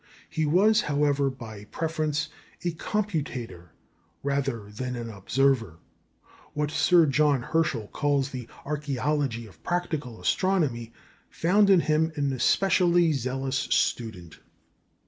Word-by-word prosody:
He 155 -1 0
was, 210 +7 +4
however, 145 -1 +1
by 110 -6 -9
preference 155 +1 -2 0.3
a 175 - 0
computator 155 - -3 0.6
rather 135 -7 -2
than 125 +4 -4
an 115 -1 -5
observer. 115 - +1 0.8
What 150 0 -1
Sir 170 +1 +5
John 145 -2 +2
Herschel 145 -9 0
calls 140 -2 0
the 125 -3 -6 0.2
"archæology 140 -4 -1
of 100 - -18
practical 155 -9 -3
astronomy" 150 -12 0 0.4
found 200 +4 +3
in 190 -3 +6
him 155 +1 +1
an 140 -3 0
especially 175 +4 +3
zealous 135 0 -2
student. 110 - -1
140 Hz, 110 wpm, -26 LUFS, 120-160 Hz, 0.8 s, in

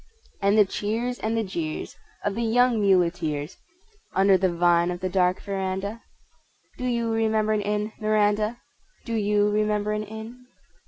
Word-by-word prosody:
And 200 +2 +3
the 210 - +7
cheers 225 +6 -2
and 220 +1 -1
the 225 - +1
jeers 165 -6 -4 0.3
of 205 - 0
the 230 - -3
young 235 0 +3
muleteers 170 -5 +1 0.6
(Under 195 0 +5
the 185 -1 +2
vine 175 0 +3
of 175 0 -3
the 185 - -2
dark 180 0 +2
veranda)? 195 +2 -3 0.8
Do 250 - -3
you 235 -2 0
remember 220 -1 +1
an 210 - +1
Inn, 210 +1 -2
Miranda, 215 +1 +1 0.5
Do 230 - -4
you 210 -1 +2
remember 210 0 0
an 210 0 -2
Inn? 220 +4 -10
210 Hz, 155 wpm, -25 LUFS, 190-220 Hz, 0.8 s, the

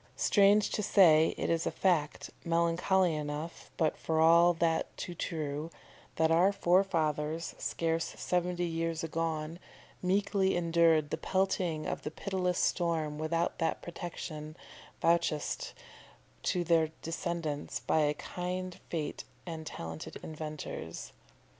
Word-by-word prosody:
Strange 205 0 +4
to - - -1
say, 165 -6 +5
it - - -1
is 165 0 +1
a - - +3
fact, 165 -6 0
melancholy 170 +2 +2
enough, 150 +2 -5
but 160 -2 +2
for 160 -1 -1
all 170 +2 +7
that 165 -1 0
too 175 - -5
true, 155 -2 -3 0.5
that 160 0 +2
our 175 +4 +5
forefathers, 165 -5 +1
scarce 165 0 -1
seventy 180 0 0
years 165 -1 -2
agone, 165 0 -2 0.4
meekly 190 0 +1
endured 165 -3 +3
the - - -1
pelting 185 -4 0
of - - -3
the - - -4
pitiless 180 +1 -2
storm 160 -4 0
without 165 +2 -1
that 165 - -1
protection 160 -2 -7 0.5
vouchsafed 165 -3 +1 0.7
to 180 - 0
their 165 -2 +3
descendants 165 -3 -3
by - - +1
a 150 -1 +2
kind 180 +2 -5
fate 155 -3 -3 0.2
and 160 -3 -6
talented 80 - -6
inventors. 155 - -6
165 Hz, 120 wpm, -31 LUFS, 155-175 Hz, 0.7 s, all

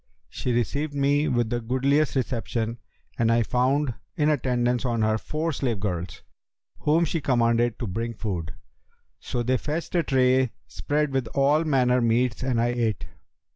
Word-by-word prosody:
She 125 - -3
received 145 +5 -1
me 145 +2 +2
with 120 -2 0
the 120 0 -1
goodliest 135 +6 +1
reception 115 -2 -2 0.4
and 115 0 +3
I 115 0 +3
found 130 +4 +1 0.2
in 150 -3 +2
attendance 125 -3 +1
on 120 -3 0
her 110 0 +1
four 155 +5 -2
slave 125 -7 -2
girls, 90 -3 -4 0.6
whom 160 +3 +2
she 165 0 -2
commanded 120 -3 +2
to 120 - -4
bring 115 +4 -3
food. 90 -7 -4 0.6
So 120 - -3
they 130 +2 +1
fetched 155 +6 -4
a 175 - +3
tray 130 -3 +2
spread 150 0 -1
with 135 -3 0
all 145 +4 +3
manner 125 -4 +3
meats, 120 +2 +1
and 130 -3 0
I 120 +1 +2
ate. 115 -5 -1
125 Hz, 160 wpm, -25 LUFS, 115-140 Hz, 0.6 s, and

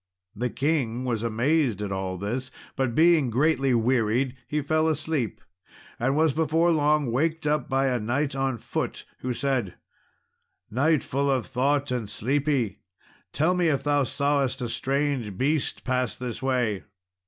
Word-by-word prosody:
The 125 +4 -1
king 130 -5 -1
was 115 -4 -1
amazed 120 - +1
at 105 -1 -3
all 95 -1 -3
this; 120 +7 -3 0.3
but 130 -3 -1
being 160 -5 +5
greatly 135 +1 +2
wearied, 120 +2 +1
he 150 - -1
fell 155 +2 +1
asleep, 145 -9 -1 0.6
and 130 +4 +1
was 155 -1 +3
before 160 +3 +2
long 150 -4 +2
waked 155 +5 0
up 150 -3 0
by 135 0 +2
a 125 -2 +1
knight 130 +6 -1
on 135 -2 0
foot, - - -4
who 130 - -3
said, 125 -7 -1 1.0
"Knight, 145 +5 +2
full 140 +1 -1
of 130 -4 +1
thought 140 +2 0
and 120 -5 -2
sleepy, 135 -3 0 0.5
tell 160 +5 +2
me 180 -2 +2
if 140 -3 +1
thou 145 0 +2
sawest 140 -1 0
a 120 - -2
strange 135 -7 -1
beast 145 +4 0
pass 125 -2 -1
this 125 -1 -5
way?" 125 -7 0
135 Hz, 155 wpm, -26 LUFS, 120-150 Hz, 1.0 s, being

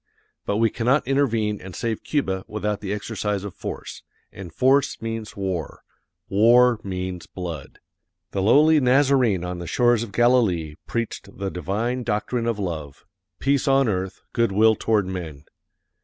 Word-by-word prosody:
But 100 - 0
we 115 0 +3
cannot 125 +4 +1
intervene 115 -7 +1
and 95 -1 -9
save 115 -2 -3
Cuba 95 -11 -1
without 105 -1 -3
the 100 -2 -4
exercise 105 -1 -3
of 100 -3 -6
force, - - -7 0.3
and 95 -4 -9
force 135 - +2
means 115 -2 -5
war; 95 -6 -4 0.4
war 120 +4 +5
means 90 -2 -5
blood. 85 -6 -7 0.5
The 95 - -1
lowly 150 +9 +5
Nazarene 130 -7 +3
on 90 0 -4
the 85 - -6
shores 120 +1 +3
of 115 -3 -5
Galilee 105 -9 +2
preached 115 -3 -4
the 100 -1 -3
divine 105 - -2
doctrine 115 +1 -1
of 115 -2 0
love, 80 -8 -5 0.3
"Peace 140 +1 +1
on 135 -1 +4
earth, 95 -2 -3
good 115 -3 +2
will 110 +3 +5
toward 105 -3 +1
men." 85 -6 -6
105 Hz, 150 wpm, -23 LUFS, 95-120 Hz, 0.5 s, war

